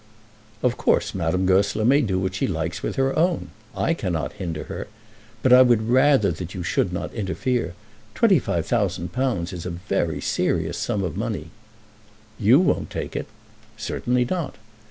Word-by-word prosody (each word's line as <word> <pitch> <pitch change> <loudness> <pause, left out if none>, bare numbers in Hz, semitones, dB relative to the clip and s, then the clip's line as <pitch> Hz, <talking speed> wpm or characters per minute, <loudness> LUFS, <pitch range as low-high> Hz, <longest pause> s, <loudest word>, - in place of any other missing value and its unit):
"Of 125 -1 +2
course - - +1
Madame 90 +1 0
Goesler 100 +3 +2
may 140 +4 +5
do 95 -7 0
what 95 0 -1
she 95 - -1
likes 80 -1 -3
with - - -3
her 135 0 +1
own. 155 - +1 0.3
I 165 - +2
cannot 90 - -2
hinder 85 -4 -4
her. - - -6 0.6
But 130 - +5
I 125 - +9
would 120 -3 +3
rather 130 -5 +4
that 90 +3 -6
you 90 - -4
should 80 - 0
not - - -4
interfere. 105 0 -2 0.4
Twenty 200 -8 +5
five 85 -8 -2
thousand 95 -6 -1
pounds 120 -9 -1
is 85 -2 -6
a - - -4
very 85 -3 -2
serious - - -1
sum 100 -2 -1
of 90 -5 -3
money." 80 +1 -3 0.9
"You 115 +7 +6
won't 185 - +1
take - - -5
it." - - -3 0.5
"Certainly 125 +3 0
not." 170 +1 -3
100 Hz, 170 wpm, -23 LUFS, 90-125 Hz, 0.9 s, I